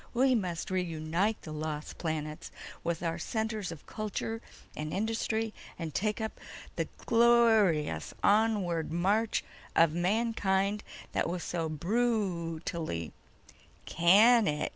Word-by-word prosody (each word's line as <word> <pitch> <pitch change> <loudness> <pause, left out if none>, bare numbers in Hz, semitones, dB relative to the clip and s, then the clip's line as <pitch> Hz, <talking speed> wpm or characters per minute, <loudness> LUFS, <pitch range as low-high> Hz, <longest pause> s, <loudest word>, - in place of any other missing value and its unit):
"We 260 +2 +4
must 180 -7 -2
reunite 180 +3 0
the 155 - -7
lost 155 0 -5
planets 155 -2 -3 0.3
with 170 0 -2
our 165 -1 -1
centers 220 -4 -2
of 165 - -10
culture 220 +1 -4 0.3
and 155 0 -4
industry, 220 +2 -1 0.2
and 165 -3 -5
take 210 +6 0
up 220 0 -4 0.4
the - - -1 0.2
glor 235 -3 +5
ious 150 -2 -3
onward 200 -7 +2
march 200 +6 +1 0.3
of 165 -2 +5
mankind 200 +1 +1 0.3
that - - 0
was 175 0 -3
so 165 -2 -2
bru 175 -2 0
tally—" 155 - -4 0.7
"Can 210 +7 +6
it!" 150 0 0
185 Hz, 120 wpm, -30 LUFS, 165-220 Hz, 0.7 s, Can